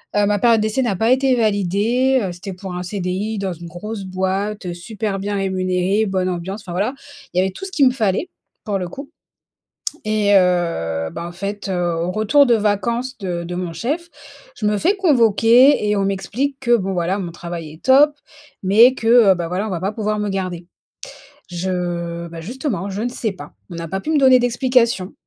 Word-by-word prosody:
heu, 205 0 +3
ma 205 0 +1
période 230 0 +4
d'essai 215 +4 0
n'a 225 -5 0
pas 225 +5 +2
été 265 0 +3
validée. 220 +5 +1
Heu, 190 - -2
c'était 190 +2 -7
pour 185 0 -8
un 180 - -4
CDI 190 +3 -3
dans 195 -2 -2
une 170 0 -10
grosse 200 +4 -6
boîte, 190 +2 -2
heu, 175 - -3
super 200 +3 -4
bien 205 +1 -3
rémunéré, 190 +1 0
bonne 185 -1 0
ambiance. 185 +4 -4
Enfin 185 - -9
voilà, 205 +8 0 0.4
il 180 - +1
y - - +5
avait 190 +1 0
tout 285 - -8
ce 385 - -7
qu'il 285 -7 +4
me - - +4
fallait, 225 - 0 0.4
pour 205 -2 -1
le 180 - -3
coup. 275 - -9 0.9
Et, 210 -1 +2
heu, 165 - +1
bah, 170 - -6
en - - -7
fait, 200 +2 -5
heu, 175 -2 0
au 170 +2 -2
retour 220 +8 +4
de 240 - +5
vacances 235 +5 -1
de 175 -4 -3
de 175 +1 -5
mon 180 -1 -3
chef. 315 - -3 0.5
Je 215 - -3
me 210 0 +1
fais 360 - +2
convoquer 245 - +5
et 210 - +2
on 200 - +1
m'explique 205 +9 -2
que 240 -2 +4
bon, 195 -3 -2
voilà, 180 +2 0
mon 175 -3 -5
travail 170 -2 -7
est 155 - -17
top, 280 +3 +6 0.5
mais 220 +7 +6
que, 225 - -4 0.2
heu, - - +4
bah, 170 -1 -3
voilà, 190 +5 -2
on - - -4
va 175 - -2
pas 195 +3 -2
pouvoir 215 -1 -2
me 210 0 -1
garder. 185 -3 -4 0.8
Je 175 -1 -3
bah, 165 0 -8
justement 205 - -4
je 200 +2 -4
ne 240 - 0
sais 240 -2 -2
pas. 185 - -11 0.2
On 170 - -7
n'a 165 0 -5
pas 190 +3 -3
pu 310 - -4
me 310 - +3
donner 260 -2 +6
d'explications 245 -5 +1
200 Hz, 210 wpm, -20 LUFS, 180-230 Hz, 0.9 s, top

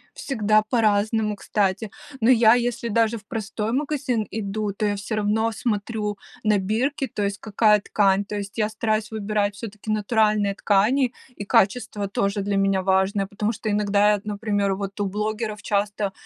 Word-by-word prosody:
Всегда 215 -5 +1
по-разному, 215 -1 +1
кстати. 200 +1 -1 0.3
Но 230 +2 +4
я 230 -2 +6
если 240 -1 -1
даже 230 +1 +1
в 210 - -20
простой 220 -1 -3
магазин 270 -5 -1
иду, 210 -1 -3
то 210 +2 -2
я 205 - +1
всё 200 +2 -4
равно 215 +2 +1
смотрю 210 -1 -2 0.3
на 210 -1 +3
бирки, 235 +9 -1
то 210 - -4
есть 200 0 -2
какая 210 0 +3
ткань, 200 -1 +2
то 210 +1 -5
есть 200 -1 -6
я 210 -1 +2
стараюсь 215 0 -1
выбирать 210 -1 -1
всё-таки 210 0 -7
натуральные 215 -1 +2
ткани, 230 +7 +2 0.3
и - - -2
качество 205 +1 +1
тоже 200 +1 -1
для 200 0 -1
меня 195 -1 +2
важное, 190 +1 +1
потому 210 +2 -2
что 220 0 -5
иногда, 205 0 +2
я 210 - +5
вот, 205 - -5
например, 205 -2 -1
вот 200 +1 -6
у 205 - +1
блогеров 210 +1 -3
часто 205 -1 -1
210 Hz, 170 wpm, -23 LUFS, 200-220 Hz, 0.3 s, я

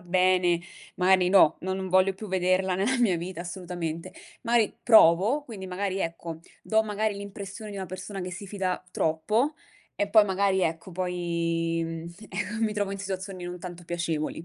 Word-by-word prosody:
bene, 180 -1 +3 0.4
magari 185 0 +4
no, 185 -5 +6
non 190 +1 -2
non 190 -1 -4
voglio 185 +1 +4
più 215 +2 -8
vederla 185 0 +1
nella 230 +8 +1
mia 205 -8 +3
vita 175 +1 -5
assolutamente." 175 -2 -5 0.3
Mari 230 -2 +2
provo, 220 - +6
quindi 200 -7 -8
magari 195 +1 -2
ecco, 165 -1 -4 0.2
do 220 0 +2
magari 215 0 -1
l'impressione 200 +1 -7
di 200 - -7
una 190 - -4
persona 185 +2 -6
che 180 0 -5
si 195 +2 -8
fida 185 -3 -2
troppo, 215 - +1 0.4
e 205 - -1
poi 215 0 +7
magari 190 -1 +1
ecco 165 +3 -2
poi, 170 -2 -1
mhmm, 165 +1 -6 0.2
eco, 225 +2 -3
mi 215 - 0
trovo 205 -2 -1
in 200 - -4
situazioni 190 -1 -5
non 175 0 -6
tanto 175 -1 -8
piacevoli. 165 -2 -3
185 Hz, 170 wpm, -27 LUFS, 175-200 Hz, 0.4 s, poi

